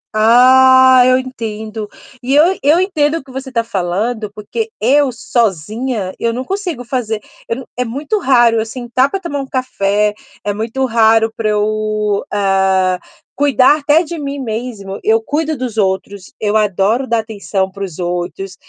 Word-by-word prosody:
Ah, 260 +3 +6
eu 255 0 +4
entendo. 220 -4 -6 0.3
E 265 +3 0
eu 340 +6 +5
eu 300 +5 +4
entendo 320 -5 +1
o 330 - -4
que 265 - -15
você 265 0 -7
tá 230 -2 0
falando, 210 +2 -2
porque 215 - -5
eu, 275 +4 +3
sozinha, 220 -1 -2
eu 230 - 0
não 250 +2 -4
consigo 355 - -4
fazer. 230 -4 -2 0.3
Eu 230 - 0
não 260 - -8
é 250 - -1
muito 285 - -3
raro 240 -7 +4
eu 220 - -1
sentar 250 +2 -1
pra 390 - -3
tomar 340 -6 -4
um 270 - -5
café, 210 -5 0 0.3
é 205 - -1
muito 230 +5 -2
raro 225 -1 +3
pra 220 -2 -1
eu, 210 0 0
ah, 190 -2 +1 0.4
cuidar 285 +1 +4
até 295 +3 +3
de 340 0 -6
mim 280 -1 -4
mesmo. 220 -5 -5
Eu 220 +1 +3
cuido 300 +6 -2
dos 245 -3 -5
outros, 190 0 -2
eu 210 0 -1
adoro 215 +4 +1
dar 235 -2 +1
atenção 200 -3 -3
para 200 +1 -7
os 180 -5 -7
outros, 180 +2 -4
230 Hz, 165 wpm, -16 LUFS, 210-265 Hz, 0.4 s, Ah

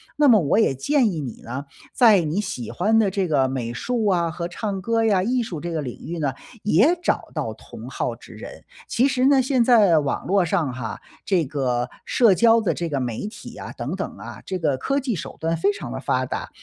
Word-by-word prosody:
那 295 0 +4
么 230 -5 +7
我 150 +5 +1
也 220 -11 +3
建 240 - +2
议 160 -4 -4
你 125 -5 -7
呢， 130 +4 -5 0.3
在 220 -7 +6
你 165 +5 -1
喜 125 - -5
欢 215 +5 +2
的 210 -3 +3
这 195 -1 -1
个 140 -5 +2
美 130 -3 -3
术 225 - -1
啊 170 -4 +1
和 170 +1 -4
唱 195 +2 -4
歌 230 +3 +1
呀、 200 -4 +3
艺 245 +5 0
术 170 -9 -6
这 175 - -4
个 160 -2 -2
领 125 -3 -7
域 170 - -4
呢， 145 -4 -1 0.3
也 220 - +3
找 - - 0
到 - - -2
同 - - -11
好 - - -3
之 - - -15
人。 - - -10 0.2
其 255 +3 +2
实 260 -1 +2
呢， 280 -1 +5
现 255 -2 +2
在 210 -9 +5
网 140 -2 -2
络 195 +1 +3
上 165 -6 0
哈， 115 -4 -5 0.2
这 180 -5 +1
个 130 -3 -1 0.2
社 230 -6 +4
交 230 +4 +5
的 220 - 0
这 170 -1 -3
个 140 -3 -1
媒 125 - -3
体 215 0 -10
啊， - - -7
等 - - -4
等 - - -5
啊， - - -9
这 190 - -3
个 155 -6 0
科 275 - 0
技 260 -3 -2
手 150 -6 -7
段 165 +1 0
非 195 +5 +2
常 175 -12 -7
地 130 - -4
发 130 -1 0
达。 - - -5
180 Hz, 250 characters per minute, -23 LUFS, 140-225 Hz, 0.3 s, 么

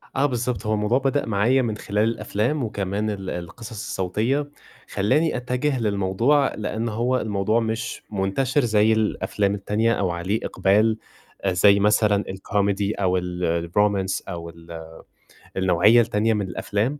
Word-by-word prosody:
آه 135 - +2
بالضبط، 120 -5 -2
هو 110 - 0
الموضوع 105 +3 +1
بدأ 135 +1 0
معايا 115 +5 +2
من 110 -4 -2
خلال 105 0 -1
الأفلام 115 +4 -1
وكمان 105 -1 -2
ال 95 -3 -4
القصص 90 +6 -7
الصوتية، 110 +7 -2 0.4
خلّاني 150 +10 +1
أتجّه 125 +2 -1
للموضوع 110 +7 +1
لإن 110 +2 -3
هو 120 +4 0
الموضوع 105 +1 0
مش 115 0 -3
منتشر 105 +8 0
زي 110 -1 +3
الأفلام 105 -2 0
التانية، 105 +3 0
أو 95 -4 0
عليه 90 +5 -2
إقبال 110 +3 +2 0.5
آآ، 95 -1 +1
زي 100 +3 +5
مثلًا 105 0 +3
الكوميدي 100 +1 -1
أو 95 -2 +1
ال 90 0 -4
الرومانس 95 +4 0
أو 85 -2 -6
ال 85 -1 -10 0.7
النوعية 95 +5 +5
التانية 110 0 +1
من 105 -3 -1
الأفلام. 105 +9 -2
105 Hz, 140 wpm, -23 LUFS, 95-115 Hz, 0.7 s, زي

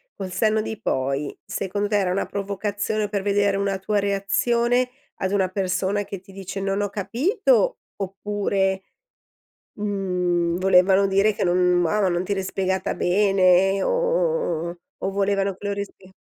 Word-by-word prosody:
col 190 -2 -6
senno 215 +2 +2
di 215 0 -5
poi, 135 -4 -1
secondo 205 +1 -2
te 210 - +1
era 190 -3 +1
una 195 - 0
provocazione 205 +1 -2
per 200 -2 -2
vedere 200 -1 +2
una 195 -1 -1
tua 210 +2 -1
reazione 235 +5 +1 0.3
ad 190 0 -2
una 195 -2 +2
persona 190 +1 -1
che 195 -1 -7
ti 195 +2 -17
dice: 195 0 -6
“Non 195 +1 -1
ho 205 - -1
capito”, 385 - +1 0.2
oppure, 195 0 -1 0.9
mhmm, 180 -4 -1
volevano 190 +1 +5
dire 195 +2 +3
che 200 - -2
non 180 0 +3
"Ah, 210 +6 +1
ma 190 - +3
non 175 0 0
ti 200 - -5
eri 195 -1 0
spiegata 190 0 -1
bene", 195 0 +3
o - - +1
o - - 0
o 175 - -8 0.3
o 195 - +1
volevano 195 0 0
che 205 +2 -7
lo 200 - 0
rispe 200 -2 -7
195 Hz, 160 wpm, -23 LUFS, 185-205 Hz, 0.9 s, volevano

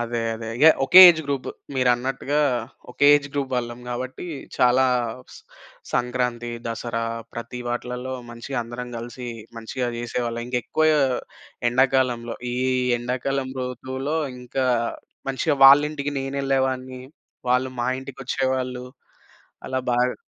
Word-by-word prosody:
అదే 120 0 -2
అదే, 115 0 -7
ఇగ 145 - +3 0.2
ఒకే 180 +7 +9
ఏజ్ 160 - -1
గ్రూప్ 140 -2 -2 0.3
మీరన్నట్టుగా 130 +3 +1 0.5
ఒకే 145 +3 +2
ఏజ్ 145 0 -5
గ్రూప్ 140 -2 -2
వాళ్ళం 120 0 -3
గాబట్టి 125 +7 -5 0.3
చాలా 125 +1 +4 0.5
స్ - - -11 0.5
సంక్రాంతి, 125 -1 -1 0.2
దసరా 115 0 -3 0.3
ప్రతి 120 +1 -6
వాటిలల్లో 125 +1 -4 0.2
మంచిగా 120 +3 -5
అందరం 120 +1 -7
గలిసి 120 +1 -7 0.3
మంచిగా 125 +3 -3
జేసేవాళ్ళం. 120 0 -3
ఇంకెక్కువ 125 +5 0 0.8
ఎండాకాలంలో 125 -2 +1 0.2
ఈ - - -2 0.4
ఎండాకాలం 130 +2 -2
ఋతువులో 130 +4 -3 0.2
ఇంకా 130 +1 -2 0.6
మంచిగా 140 +3 0
వాళ్ళింటికి 145 +1 +5
నేనెళ్ళేవాన్ని. 135 -1 -1 0.5
వాళ్ళు 125 +1 +2
మా 120 - 0 0.2
ఇంటికొచ్చేవాళ్ళు. 130 -1 -3 0.8
అలా 130 0 -1
బాగా 125 +1 +1
125 Hz, 110 wpm, -23 LUFS, 120-135 Hz, 0.8 s, ఒకే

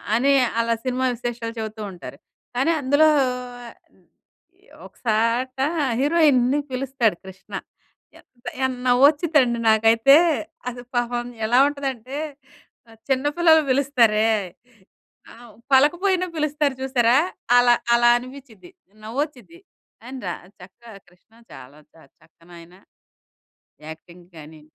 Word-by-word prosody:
అని 275 +4 +2 0.3
అలా 230 0 +1
సినిమా 255 +1 -1
విశేషాలు 235 -1 -5
చెవుతూ 220 0 -6
ఉంటారు. 180 - -11 0.4
కానీ 270 +7 +1
అందులో 285 +4 +3 0.6
ఆహ్, 230 - -11 1.1
ఒక - - -15
సాట 230 +4 0 0.4
హీరోయిన్‌ని 290 -3 +2
పిలుస్తాడు 255 -7 -1
'కృష్ణ.' 190 0 -9 0.6
ఎంత 240 -1 -20 0.2
ఎన్ 260 - -2
నవ్వొచ్చిదండి 280 -1 +3
నాకైతే 225 +5 +5 0.5
అది 245 0 -9
పాపం 240 0 -1 0.2
ఎలా 240 +3 +3
ఉంటదంటే 270 -2 -5 0.9
చిన్న 265 +1 0
పిల్లలు 320 -2 +5
పిలుస్తారే 245 -5 +2 1.1
ఆ! - - -15 0.4
పలకపోయినా 355 +7 +3
పిలుస్తారు 300 -2 -1
చూసారా! 250 -2 +2 0.4
అలా 245 0 +5 0.2
అలా 240 0 +4
అనిపించిద్ది 245 -7 -12 0.3
నవ్వొచిద్ది. 285 +7 -6 0.4
ఆయన 260 +3 -9
రా 175 - -3 0.2
చక్క 185 +5 -16 0.3
'కృష్ణ' 220 +6 -25
చాలా 140 +4 -14
చ - - -29 0.3
చక్కనైనా 170 +2 -17 1.1
యాక్టింగ్ 170 +2 -13
గానీ 155 0 -13
245 Hz, 100 wpm, -22 LUFS, 220-275 Hz, 1.1 s, నాకైతే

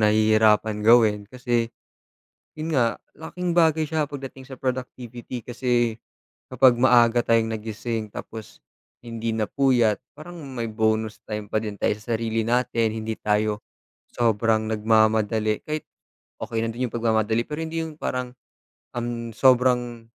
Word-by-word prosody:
nahihirapan 110 0 +3
gawin, 110 -1 +5
kasi, 120 -1 -1 0.9
yun 155 +1 -4
nga, 125 -7 +1 0.2
laking 180 +2 -4
bagay 160 -2 +3
siya 155 0 -1
pagdating 135 -2 -8
sa 130 - -9
productivity 125 -2 -5
kasi, 120 -1 0 0.5
kapag 130 0 +5
maaga 120 -1 +4
tayong 115 -1 +2
nagising 110 0 -4
tapos, 110 +1 -9 0.5
hindi 115 0 -3
napuyat, 115 0 +1 0.2
parang 175 +3 -10 0.2
may 120 -3 -3
bonus 110 0 -1
time 105 -1 -5
pa 110 +1 -1
din 105 -2 -6
tay - - +1
sa 110 +3 -4
sarili 115 0 -1
natin 115 -1 +1
hindi 110 0 -4
tayo, 105 0 0 0.5
sobrang 110 -1 +1
nagmamadali 110 0 +2
kahit, 155 0 -4 0.5
okey 115 - -3
lang 115 - -2
din 125 +2 -2
yung - - -18
pagmamadali 110 0 +1
pero 150 +4 -6
hindi 160 0 -3
yung 160 -1 -10
parang, 125 -1 -3 0.6
um, 120 - -3
ang 120 - -3 0.2
sobrang, 125 -1 +2
115 Hz, 135 wpm, -24 LUFS, 110-125 Hz, 0.9 s, gawin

